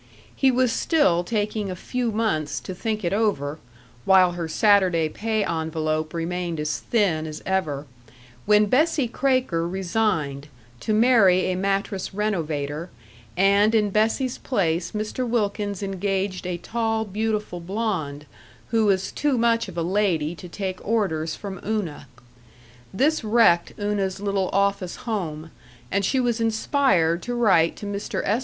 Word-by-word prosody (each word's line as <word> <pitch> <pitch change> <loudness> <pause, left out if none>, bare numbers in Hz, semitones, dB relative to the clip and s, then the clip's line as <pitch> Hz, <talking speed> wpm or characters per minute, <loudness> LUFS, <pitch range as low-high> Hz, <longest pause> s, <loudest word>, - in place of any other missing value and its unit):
He 270 - +3
was 255 -1 +2
still 185 - +2
taking 210 +1 -2
a 185 - -4
few 245 +5 -2
months 155 -10 -1
to 185 - -6
think 215 +3 -3
it 175 +1 0
over 165 -9 0 0.4
while 185 +1 +5
her 175 -2 -4
Saturday 185 -2 +3
pay 220 +3 -1
envelope 155 -1 -2
remained 170 0 -3
as 150 0 -2
thin 180 -9 0
as 155 0 -8
ever 155 -7 -1 0.6
when 210 0 +5
Bessie 285 +4 +2
Kraker 255 -10 0
resigned, 170 -7 -1 0.3
to 215 - -3
marry 210 -5 +4
a - - -1
mattress 195 0 -2
renovator, 160 -6 -2 0.5
and 200 +3 +4
in 210 -2 +2
Bessie's 225 +5 +1
place 175 -8 -1
Mr. 215 +4 -3
Wilkins 205 -3 -1
engaged 195 -1 -2
a 180 -1 -2
tall, 225 +3 -1
beautiful 210 -2 -2
blonde, 170 -7 -3 0.5
who 225 -2 +3
was 195 -1 +1
too 290 -3 0
much 230 -1 +2
of 180 -3 -9
a 170 - 0
lady 175 -4 +1
to 175 +1 -10
take 190 0 -5
orders 185 -8 0
from 195 -3 -7
Una. 195 -10 -3 0.8
This 285 +8 +1
wrecked 215 -6 +3
Una's 205 -2 -1
little 195 -2 -1
office 200 -2 0
home, 165 -8 -3 0.4
and 200 0 +1
she 260 +7 +1
was 240 -2 0
inspired 220 - +2
to 245 - -4
write 190 -9 +3
to - - -8
Mr. 200 0 -3
S. 215 +4 +2
195 Hz, 145 wpm, -24 LUFS, 170-220 Hz, 0.8 s, while